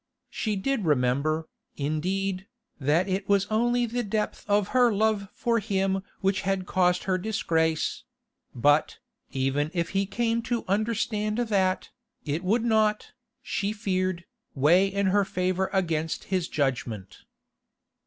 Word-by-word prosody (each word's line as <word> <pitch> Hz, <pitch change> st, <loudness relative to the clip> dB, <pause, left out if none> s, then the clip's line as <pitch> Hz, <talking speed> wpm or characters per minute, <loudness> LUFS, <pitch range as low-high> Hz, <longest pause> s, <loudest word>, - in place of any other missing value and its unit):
She 215 Hz, -2 st, -1 dB
did 225 Hz, +4 st, -1 dB
remember, 150 Hz, +3 st, +1 dB, 0.3 s
indeed, 185 Hz, +6 st, -2 dB, 0.3 s
that 155 Hz, +7 st, +2 dB
it 195 Hz, +1 st, -2 dB
was 200 Hz, -1 st, +4 dB
only 240 Hz, +2 st, +2 dB
the 240 Hz, +1 st, -2 dB
depth 215 Hz, -1 st, -3 dB
of 205 Hz, -1 st, +2 dB
her 250 Hz, -2 st, +4 dB
love 210 Hz, -1 st, +1 dB
for 235 Hz, -1 st, 0 dB
him 195 Hz, -2 st, 0 dB, 0.2 s
which 195 Hz, 0 st, +1 dB
had 195 Hz, -1 st, -1 dB
caused 180 Hz, -1 st, +2 dB
her 185 Hz, -1 st, 0 dB
disgrace; 160 Hz, -6 st, 0 dB, 0.5 s
but, 145 Hz, +5 st, +3 dB, 0.3 s
even 135 Hz, +3 st, 0 dB
if 170 Hz, -1 st, 0 dB
he 195 Hz, 0 st, 0 dB
came 230 Hz, +2 st, 0 dB
to 240 Hz, -1 st, -2 dB
understand 215 Hz, +1 st, 0 dB
that, 195 Hz, -6 st, 0 dB, 0.3 s
it 155 Hz, +3 st, -2 dB
would 220 Hz, +5 st, +1 dB
not, 215 Hz, -2 st, +2 dB, 0.3 s
she 200 Hz, +1 st, -1 dB
feared, 185 Hz, -4 st, -1 dB, 0.3 s
weigh 170 Hz, +8 st, +5 dB
in 200 Hz, +1 st, -1 dB
her 200 Hz, +2 st, +3 dB
favour 185 Hz, 0 st, -1 dB
against 165 Hz, -4 st, -1 dB
his 180 Hz, -3 st, +1 dB
judgment. 120 Hz, -, -2 dB
190 Hz, 135 wpm, -27 LUFS, 165-215 Hz, 0.5 s, weigh